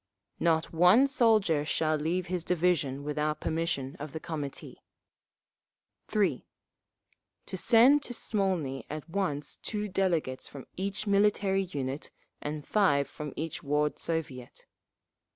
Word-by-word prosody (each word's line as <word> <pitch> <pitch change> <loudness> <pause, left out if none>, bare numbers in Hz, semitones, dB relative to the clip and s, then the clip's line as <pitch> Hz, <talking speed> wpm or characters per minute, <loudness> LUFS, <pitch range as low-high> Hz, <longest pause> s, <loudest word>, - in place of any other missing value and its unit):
Not 165 -1 +1
one 180 +10 +6
soldier 220 - +3
shall 155 +1 +1
leave 165 +4 -1
his 180 -2 -3
division 165 -6 +1
without 150 +1 -1
permission 160 -5 -2
of 150 -1 -7
the 160 - -4
Committee. 150 -4 -6 1.3
3. 210 -2 +1 1.0
To - - -5
send 255 +5 +6
to 265 - -4
Smolny 180 - -1
at 150 +1 -6
once 165 -6 -2
two 210 -1 -3
delegates 175 -9 -1
from 140 - -10
each 200 +3 -3
military 200 -1 +2
unit 140 -5 -4 0.3
and 150 -1 -5
five 145 -10 +3
from 150 +1 -7
each 160 0 -4
Ward 150 0 0
Soviet. 140 -7 -4
165 Hz, 120 wpm, -29 LUFS, 145-195 Hz, 1.3 s, one